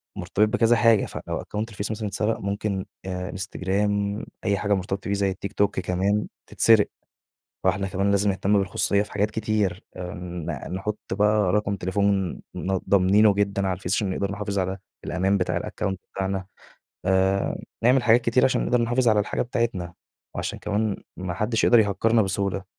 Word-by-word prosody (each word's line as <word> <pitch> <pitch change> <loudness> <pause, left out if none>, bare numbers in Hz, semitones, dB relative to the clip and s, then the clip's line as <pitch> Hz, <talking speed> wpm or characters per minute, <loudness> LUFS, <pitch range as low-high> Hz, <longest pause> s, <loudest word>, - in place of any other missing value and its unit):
مرتبط 105 +1 +1
بكذا 115 +2 +3
حاجة، 115 -3 +4
فلو - - -5
أكونت 110 +2 -4
الفيس 105 -1 -4
مثلًا 110 -1 -3
اتسرق 105 +2 -1
ممكن 100 -1 -2 0.2
أ 90 -1 -4
انستجرام 100 +2 -1 0.2
أي 100 -1 +2
حاجة 105 +1 +1
مرتبطة 95 +1 -2
بيه 100 - 0
زي 100 -1 +1
التيك 100 - -6
توك 100 -2 +1
كمان 95 +4 0 0.2
تتسرق. 110 -2 +5 0.8
فإحنا 95 +1 +1
كمان 95 +1 0
لازم 100 +1 +2
نهتم 100 +2 +2
بالخصوصية 100 +1 +1
في 105 - -10
حاجات 105 +1 +1
كتير. 105 -4 -1
أ - - -7
ن 85 -5 -6
نحُط 105 +2 -3
بقى 105 -1 +3
رقم 105 -1 +1
تليفون 95 0 0 0.2
ن 95 +1 -1
ضامنينه 100 +2 +5
جدًا 100 -1 0
على 95 - +1
الفيس 90 +1 -2
عشان 100 -1 0
نقدر 100 +1 -2
نحافظ 100 -1 -3
على 95 +1 -1 0.3
الأمان 95 +4 +1
بتاع 90 - -1
الأكونت 95 -1 -3
بتاعنا. 95 -1 -2 0.6
آآ 95 +1 +1 0.2
نعمل 125 +2 +5
حاجات 120 +1 +5
كتير 120 +1 +2
عشان 130 - +2
نقدر 125 -1 +2
نحافظ 120 +1 +2
على 110 -1 +4
الحاجة 105 - -1
بتاعتنا، 115 -8 -2 0.4
وعشان - - -3
كمان 105 0 -1 0.2
ما 90 -1 -4
حدّش 110 +4 0
يقدر 120 - +6
يهكّرنا 110 +2 +3
بسهولة. 100 0 -1
100 Hz, 170 wpm, -25 LUFS, 95-105 Hz, 0.8 s, يقدر